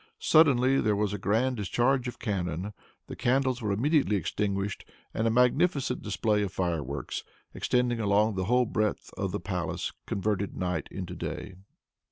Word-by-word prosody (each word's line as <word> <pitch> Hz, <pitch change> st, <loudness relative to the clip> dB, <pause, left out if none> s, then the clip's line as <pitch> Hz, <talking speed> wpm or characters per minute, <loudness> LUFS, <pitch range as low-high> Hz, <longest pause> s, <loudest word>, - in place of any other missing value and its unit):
Suddenly 135 Hz, -4 st, +4 dB
there 105 Hz, -1 st, +2 dB
was 105 Hz, 0 st, 0 dB
a 105 Hz, -, -3 dB
grand 115 Hz, +6 st, +1 dB
discharge 120 Hz, +5 st, +1 dB
of 120 Hz, -, -6 dB
cannon. 95 Hz, -1 st, -3 dB, 0.3 s
The -, -, -8 dB
candles 130 Hz, 0 st, +1 dB
were 105 Hz, -2 st, -1 dB
immediately 135 Hz, +2 st, +2 dB
extinguished, 100 Hz, +2 st, -2 dB, 0.3 s
and 110 Hz, -, 0 dB
a -, -, +4 dB
magnificent 125 Hz, +3 st, +2 dB
display 105 Hz, 0 st, 0 dB
of 100 Hz, -2 st, -2 dB
fireworks, 80 Hz, -7 st, -3 dB, 0.3 s
extending 125 Hz, -1 st, +1 dB
along 105 Hz, +1 st, +3 dB
the 95 Hz, -1 st, -2 dB
whole 125 Hz, +4 st, +3 dB
breadth 110 Hz, -2 st, -1 dB
of -, -, -2 dB
the -, -, -2 dB
palace, -, -, -3 dB, 0.2 s
converted 100 Hz, 0 st, -1 dB
night 90 Hz, -5 st, -2 dB
into -, -, -6 dB
day. -, -, -5 dB
105 Hz, 155 wpm, -28 LUFS, 100-125 Hz, 0.3 s, Suddenly